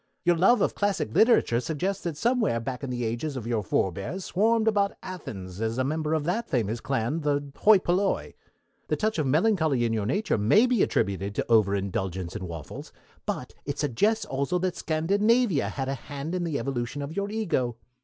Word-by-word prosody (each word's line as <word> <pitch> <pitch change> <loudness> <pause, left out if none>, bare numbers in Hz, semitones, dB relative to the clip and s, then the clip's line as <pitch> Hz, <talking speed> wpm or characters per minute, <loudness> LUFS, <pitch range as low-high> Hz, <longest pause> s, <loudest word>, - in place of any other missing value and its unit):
Your 175 0 +4
love 195 +7 +4
of - - +2
classic 200 - -1
literature 220 - +4
suggests 170 +10 -2
that 165 -4 -3
somewhere 230 - +1
back 125 +2 -5
in 135 - -3
the 120 -1 -2
ages 120 +6 -3
one - - -2
of - - -7
your 115 -2 0
forbears 100 - -2
swarmed 220 +3 +2
about 205 -1 +2
Athens 100 - -7
as 115 +1 -1
a 130 - +2
member 155 +3 -1
of 155 - -1
that 220 +9 -2
famous 115 -3 0
clan, 135 +4 -1
the 145 -1 -1
Hoi 215 -1 +6
Polloi. 185 +2 0 0.5
The - - +1
touch 215 -4 -1
of 150 - +1
melancholy 155 - +2
in 115 - 0
your 105 -2 -1
nature 200 - 0
may 200 - +5
be 245 -5 +2
attributed 100 +1 0
to - - -2
overindulgence 95 -4 +1
in 95 - -4
waffles, 80 -3 -8 0.4
but - - -3
it 145 0 -4
suggests 205 - +1
also 140 +3 -1
that 180 0 -1
Scandinavia 200 - +2
had 135 -2 -3
a 135 - -1
hand 140 +4 -6
in 180 -1 -1
the 155 -4 -1
evolution 125 +2 -3
of 145 +4 -6
your 200 0 -1
Ego. 170 - -1
145 Hz, 195 wpm, -27 LUFS, 115-195 Hz, 0.5 s, Hoi